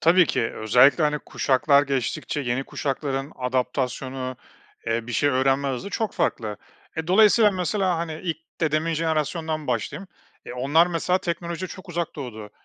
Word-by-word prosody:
Tabii 175 Hz, +1 st, +5 dB
ki. -, -, 0 dB
Özellikle, 125 Hz, +8 st, +5 dB
hani, 150 Hz, 0 st, +1 dB
kuşaklar 140 Hz, +1 st, +2 dB
geçtikçe 135 Hz, +1 st, -2 dB
yeni 130 Hz, 0 st, -1 dB
kuşakların 135 Hz, 0 st, -3 dB
adaptasyonu, 130 Hz, 0 st, -2 dB, 0.5 s
eee, 115 Hz, +1 st, -1 dB
bir 125 Hz, -, -5 dB
şey 145 Hz, -, +2 dB
öğrenme 135 Hz, +1 st, +2 dB
hızı 130 Hz, +9 st, -4 dB
çok 220 Hz, -1 st, -2 dB
farklı. 105 Hz, -3 st, -1 dB, 0.4 s
E, 160 Hz, 0 st, -3 dB
dolayısıyla 210 Hz, +3 st, +6 dB
mesela, 185 Hz, -1 st, 0 dB
hani, 160 Hz, -2 st, -4 dB
ilk 165 Hz, -3 st, -1 dB, 0.2 s
dedemin 160 Hz, +1 st, +1 dB
jenerasyonundan 160 Hz, -1 st, -1 dB
başlayayım. 125 Hz, -, -3 dB, 0.4 s
E, -, -, -7 dB
onlar 145 Hz, +7 st, +3 dB
mesela 180 Hz, +2 st, 0 dB
teknolojiye 170 Hz, +1 st, -4 dB
çok 185 Hz, 0 st, -11 dB
uzak 170 Hz, -2 st, -3 dB
doğdu. 110 Hz, -6 st, -7 dB
150 Hz, 145 wpm, -24 LUFS, 130-170 Hz, 0.5 s, dolayısıyla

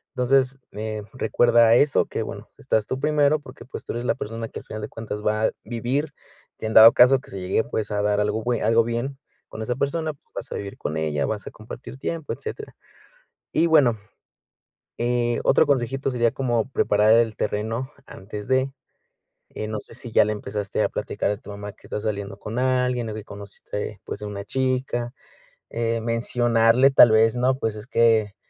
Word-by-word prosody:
Entonces, 130 Hz, +1 st, +2 dB
eh, 110 Hz, 0 st, -4 dB
recuerda 120 Hz, -2 st, +4 dB
a 115 Hz, -, +6 dB
eso 145 Hz, +3 st, +3 dB
que -, -, -3 dB
bueno, -, -, -8 dB
estás 110 Hz, -1 st, 0 dB
tú 130 Hz, -, -3 dB
primero 150 Hz, 0 st, +2 dB
porque, 130 Hz, -2 st, -13 dB
pues, 135 Hz, -, -8 dB
tú -, -, -4 dB
eres 120 Hz, +1 st, -4 dB
la 140 Hz, -, +1 dB
persona 115 Hz, -2 st, -5 dB
que -, -, -7 dB
al -, -, -22 dB
final 110 Hz, -, -7 dB
de 105 Hz, -, -5 dB
cuentas 105 Hz, -2 st, -6 dB
va 110 Hz, +1 st, +1 dB
a -, -, +2 dB
vivir. 130 Hz, +6 st, -2 dB, 0.5 s
Y -, -, -5 dB
en 110 Hz, -, -2 dB
dado 115 Hz, +1 st, +10 dB
caso 130 Hz, +2 st, +6 dB
que -, -, -15 dB
se 95 Hz, -, -6 dB
llegue, 95 Hz, +4 st, +1 dB
pues, 110 Hz, -1 st, -3 dB
a 105 Hz, 0 st, 0 dB
dar 105 Hz, 0 st, +1 dB
algo 105 Hz, +1 st, 0 dB
bue 120 Hz, -1 st, 0 dB
algo 115 Hz, +1 st, +4 dB
bien 120 Hz, +4 st, -3 dB, 0.3 s
con 110 Hz, -, -8 dB
esa 120 Hz, +3 st, -2 dB
persona, 155 Hz, +4 st, -1 dB
pues, 140 Hz, -, -32 dB
vas -, -, -6 dB
a -, -, -3 dB
vivir 100 Hz, -1 st, -6 dB
con 75 Hz, -, -4 dB
ella, 75 Hz, -3 st, -1 dB
vas 105 Hz, +4 st, -4 dB
a -, -, -6 dB
compartir 115 Hz, +4 st, -10 dB
tiempo, 165 Hz, 0 st, -4 dB
etcétera. 430 Hz, -1 st, -7 dB, 0.8 s
Y 165 Hz, -, +3 dB
bueno, 130 Hz, -9 st, +4 dB, 1.0 s
eh, 120 Hz, 0 st, 0 dB
otro -, -, +4 dB
consejito 135 Hz, 0 st, 0 dB
sería 120 Hz, -1 st, +2 dB
como 120 Hz, -3 st, -1 dB
preparar 105 Hz, -3 st, +3 dB
el 115 Hz, -1 st, +3 dB
terreno 115 Hz, +6 st, -2 dB, 0.2 s
antes 105 Hz, +2 st, -8 dB
de 130 Hz, +1 st, +1 dB, 0.8 s
eh, 110 Hz, -, -5 dB
no 110 Hz, 0 st, -3 dB
sé -, -, -12 dB
si 120 Hz, 0 st, -9 dB
ya -, -, +5 dB
le 105 Hz, -, -1 dB
empezaste 105 Hz, -1 st, -3 dB
a -, -, +1 dB
platicar -, -, -2 dB
a 105 Hz, -, -3 dB
tu 105 Hz, -, -11 dB
mamá 105 Hz, 0 st, -7 dB
que -, -, -21 dB
estás 105 Hz, -, -4 dB
saliendo 100 Hz, -2 st, -3 dB
con 105 Hz, +3 st, -6 dB
alguien 125 Hz, -2 st, +1 dB
o -, -, -5 dB
que 110 Hz, -1 st, -6 dB
conociste, 105 Hz, +1 st, -7 dB
pues, 100 Hz, -, -7 dB
a -, -, -4 dB
una 100 Hz, -1 st, -6 dB
chica, 130 Hz, -1 st, -1 dB, 0.6 s
eh, 115 Hz, 0 st, -1 dB
mencionarle 115 Hz, +2 st, +3 dB
tal 120 Hz, -4 st, +8 dB
vez, 110 Hz, +2 st, +4 dB
no, 130 Hz, +1 st, +2 dB
pues, 110 Hz, -1 st, -1 dB
es 105 Hz, +1 st, -8 dB
que, 110 Hz, -5 st, +3 dB
115 Hz, 200 wpm, -24 LUFS, 105-130 Hz, 1.0 s, dado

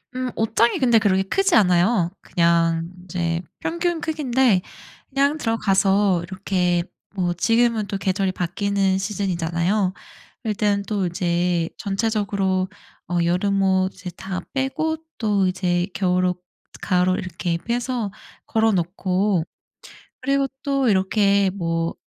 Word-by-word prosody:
음 255 Hz, -1 st, -2 dB
옷장이 230 Hz, -, +2 dB
근데 240 Hz, -5 st, +5 dB
그렇게 190 Hz, -3 st, +2 dB
크지 390 Hz, -, +2 dB
않아요. 180 Hz, -2 st, +3 dB
그냥 170 Hz, -1 st, +1 dB, 0.2 s
이제 170 Hz, -2 st, -2 dB, 0.2 s
평균 340 Hz, +1 st, -1 dB
크기인데 265 Hz, -, +2 dB, 0.5 s
그냥 280 Hz, +2 st, +1 dB
들어가서 195 Hz, -, +2 dB
이렇게 180 Hz, -1 st, 0 dB, 0.3 s
뭐 180 Hz, -2 st, 0 dB
지금은 230 Hz, +3 st, +2 dB
또 200 Hz, -, -3 dB
계절이 190 Hz, 0 st, 0 dB
바뀌는 190 Hz, +2 st, 0 dB
시즌이잖아요. 185 Hz, -1 st, 0 dB, 0.5 s
일단 205 Hz, -2 st, 0 dB
또 200 Hz, -4 st, 0 dB
이제 175 Hz, -1 st, 0 dB
전체적으로 200 Hz, -3 st, 0 dB, 0.4 s
어 175 Hz, -, 0 dB
여름옷을 190 Hz, 0 st, +1 dB
다 185 Hz, +1 st, -5 dB
빼고 315 Hz, +4 st, -1 dB, 0.2 s
또 205 Hz, -4 st, +1 dB
이제 180 Hz, -1 st, 0 dB
겨울 180 Hz, 0 st, +1 dB
옷, 180 Hz, 0 st, -1 dB, 0.4 s
가을옷 185 Hz, -1 st, +2 dB
이렇게 175 Hz, -3 st, -3 dB
빼서 240 Hz, +1 st, -2 dB, 0.3 s
걸어놓고 190 Hz, -3 st, +1 dB, 0.8 s
그리고 275 Hz, +1 st, +1 dB, 0.2 s
또 275 Hz, -3 st, +1 dB
이렇게 200 Hz, 0 st, +3 dB
뭐 165 Hz, -3 st, -2 dB
195 Hz, 255 characters per minute, -22 LUFS, 180-225 Hz, 0.8 s, 근데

